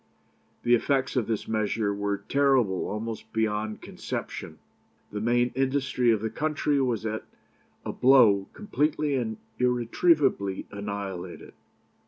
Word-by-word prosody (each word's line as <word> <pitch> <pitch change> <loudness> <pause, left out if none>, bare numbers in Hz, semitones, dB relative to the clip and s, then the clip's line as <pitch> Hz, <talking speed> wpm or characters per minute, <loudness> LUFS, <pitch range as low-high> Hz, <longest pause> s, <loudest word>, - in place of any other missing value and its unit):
"The 120 - +3
effects 130 +3 +2
of 125 -4 +1
this 110 -2 -2
measure 110 -1 0
were 100 0 -1
terrible 125 -3 +2
almost 110 +1 -5
beyond 110 -1 -1
conception. - - -6 0.5
The 105 - -4
main 120 +2 +2
industry 130 -2 +1
of 110 -3 +3
the 110 0 -2
country 150 -2 0
was 120 -4 0
at 110 0 -2 0.6
a - - -3
blow 115 -7 +5
completely 150 -7 0
and 115 -5 -1 0.2
irretrievably 125 - +2
annihilated. 100 -3 -6
115 Hz, 120 wpm, -27 LUFS, 105-135 Hz, 0.6 s, blow